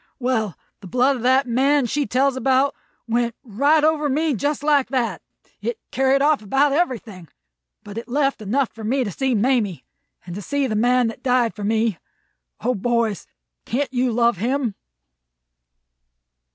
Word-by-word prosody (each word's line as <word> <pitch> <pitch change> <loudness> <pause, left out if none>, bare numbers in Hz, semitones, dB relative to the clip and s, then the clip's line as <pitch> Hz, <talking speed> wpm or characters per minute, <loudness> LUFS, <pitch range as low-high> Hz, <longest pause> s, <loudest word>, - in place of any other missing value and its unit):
Well, 235 - -1 0.2
the 195 - -11
blood 255 +7 +2
of - - -7
that 260 +3 +3
Man 270 +3 +2
she 280 +3 -1
tells 265 +4 +2
about 265 +2 +2 0.3
went 235 0 0
right 285 +7 +2
over 305 -1 +2
me 305 +2 +1
just 285 +5 -2
like 290 -3 +3
that. 250 -3 -1 0.4
It 475 - -3
carried 270 +1 +2
off 300 -3 +3
about 270 +7 +2
everything; 235 - -2 0.6
but 205 +2 -6
it 235 - -10
left 275 -1 0
enough 240 +5 0
for 225 - -11
me 255 +5 +1
to 205 - -4
see 265 +5 0
Mamie, 220 -5 0 0.4
and 175 - -7
to 200 - -6
see 285 +6 -1
the 220 -5 -2
Man 245 +3 +3
that 225 - -9
died 250 -3 +2
for 210 - -8
me. 220 -2 0 0.6
O 250 +3 +1
boys, 230 -1 -1 0.4
can't 265 +3 -2
you 250 0 +1
love 235 -2 +2
him?" 245 +2 -1
250 Hz, 165 wpm, -22 LUFS, 225-275 Hz, 0.6 s, that